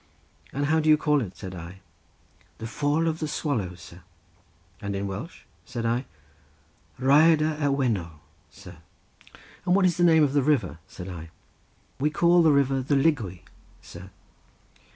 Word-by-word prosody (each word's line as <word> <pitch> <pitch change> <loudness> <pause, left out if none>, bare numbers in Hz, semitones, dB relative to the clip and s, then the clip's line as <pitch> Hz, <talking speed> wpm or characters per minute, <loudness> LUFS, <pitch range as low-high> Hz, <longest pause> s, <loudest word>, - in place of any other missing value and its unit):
"And 145 +1 -2
how 160 +2 +2
do 155 0 +1
you 155 - +7
call 150 -2 +1
it?" 100 -6 -7
said 95 -2 -8
I. 90 +2 -9 0.8
"The 115 - -7
Fall 145 +7 0
of 160 0 -1
the 155 - -2
Swallow, 115 - -2
sir." 85 +1 -14 0.8
"And 100 -1 -4
in 100 +1 -3
Welsh?" 100 - -7 0.2
said 120 -2 -5
I. 120 +3 0 0.9
"Rhaiadr 155 +3 +4
y 145 - +1
Wennol, 110 - -1 0.3
sir." 90 -2 -13 0.9
"And 180 0 +2
what 195 -1 +4
is 180 - +2
the 175 - +2
name 160 -2 +5
of 140 -2 +1
the 145 - +3
river?" 130 - 0
said 90 - -9
I. 85 -3 -8 0.7
"We 150 +3 +2
call 170 +3 +4
the 160 -2 +5
river 135 -1 +2
the 135 +3 0
Lygwy, 135 - 0 0.4
sir." 95 +2 -11
135 Hz, 160 wpm, -25 LUFS, 95-155 Hz, 0.9 s, you